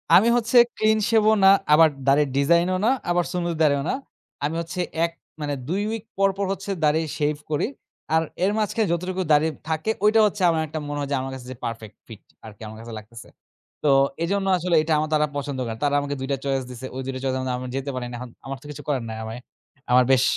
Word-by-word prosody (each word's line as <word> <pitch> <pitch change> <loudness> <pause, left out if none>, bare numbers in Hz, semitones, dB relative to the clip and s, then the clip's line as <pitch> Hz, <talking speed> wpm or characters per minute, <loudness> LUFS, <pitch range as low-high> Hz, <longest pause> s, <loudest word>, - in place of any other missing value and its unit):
আমি 205 +5 +6
হচ্ছে 240 +1 +2 0.2
ক্লিন 220 0 +3
শেভও 220 -1 +4
না, 195 - +9 0.2
আবার 160 +1 +7 0.2
দাড়ির 140 +1 +4
ডিজাইনও 170 +6 +3
না, 245 - +4 0.2
আবার 175 0 +2
সুন্নতি 170 -2 -2
দাড়িও 140 -2 +3
না। - - +1 0.5
আমি 155 - -2
হচ্ছে, 170 +2 -6 0.3
১ 170 - -4 0.3
মানে 145 -1 -2
২ 190 +6 -1
উইক 225 -2 -4 0.2
পরপর 195 0 +2
হচ্ছে 195 +1 -6
দাড়ি 150 +2 +3 0.2
শেভ 150 0 +1 0.2
করি। 150 - +1 0.5
আর 160 - +3 0.2
এর 195 - +3
মাঝখানে 215 0 0
যতটুকু 185 +2 -2
দাড়ি 150 +2 +4 0.2
থাকে, 160 +7 0
ঐটা 220 +1 +5
হচ্ছে 210 -1 -1
আমার 160 -1 +1
একটা 155 +1 -5
মনে 145 0 -4
হয়, 140 - -2
যে - - +2
আমার 135 0 -5
কাছে 130 -2 -9
যে - - -7
পারফেক্ট 110 -2 -6
ফিট 110 -3 -11 0.2
আরকি, 105 0 -12
আমার 110 0 -9
কাছে 115 0 -9
লাগতেছে। 115 +2 -13 0.6
তো - - +2 0.4
এজন্য 195 +2 0
আসলে 175 0 0
এটা 155 0 0
আমার 155 0 -1
তারা 150 0 +3
পছন্দ 140 -2 -4
করে। 115 -1 -5
তারা 145 0 +2
আমাকে 145 0 -3
২ 135 - -4
টা 135 - +1
চয়েস 135 -1 0
দিছে। 125 +1 -8
ওই 130 - -3
২ 135 - -2
টা 130 - -4
চয়েস 130 -1 0
এর - - -2
মধ্যে 130 -1 -2
আমি 130 - -6
যেতে 135 +1 -3
পারি 125 - -3
না। - - -6
এখন 125 - -7 0.2
আমার 135 0 -5
তো - - -17
কিছু 145 - -9
করার 135 -5 0
নাই। 110 - -5
অ্যায়ে 110 - -5
আমি 110 +2 -6 0.5
আমার 125 +1 +6
বেশ 130 -1 +5
150 Hz, 235 wpm, -24 LUFS, 130-185 Hz, 0.6 s, না